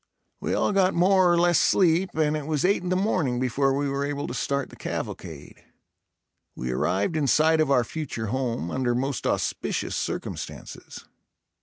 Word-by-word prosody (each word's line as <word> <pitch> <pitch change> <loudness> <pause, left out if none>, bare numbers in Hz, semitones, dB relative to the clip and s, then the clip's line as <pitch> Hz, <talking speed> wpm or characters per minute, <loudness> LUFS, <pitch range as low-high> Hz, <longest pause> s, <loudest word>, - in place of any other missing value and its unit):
We - - -2
all - - +1
got 195 -2 +2
more 185 +1 +4
or 175 - +3
less 175 -1 +4
sleep 180 0 +2
and 155 -1 +1
it 150 -1 -4
was 155 0 0
eight 195 0 +2
in 180 - -4
the 185 - +1
morning 180 - 0
before 130 +2 +1
we 145 0 0
were 140 0 -2
able 145 0 -3
to - - -5
start 140 -1 -2
the - - -12
cavalcade. - - -7 0.9
We 65 0 -4
arrived 95 - 0
in 150 -3 +1
sight 155 +3 +4
of 155 - +1
our 125 -3 +4
future 125 -4 -5
home, 120 -10 -2
under 125 -2 0
most 135 +2 -2
auspicious - - -2
circumstances. - - -6
145 Hz, 175 wpm, -25 LUFS, 130-175 Hz, 0.9 s, more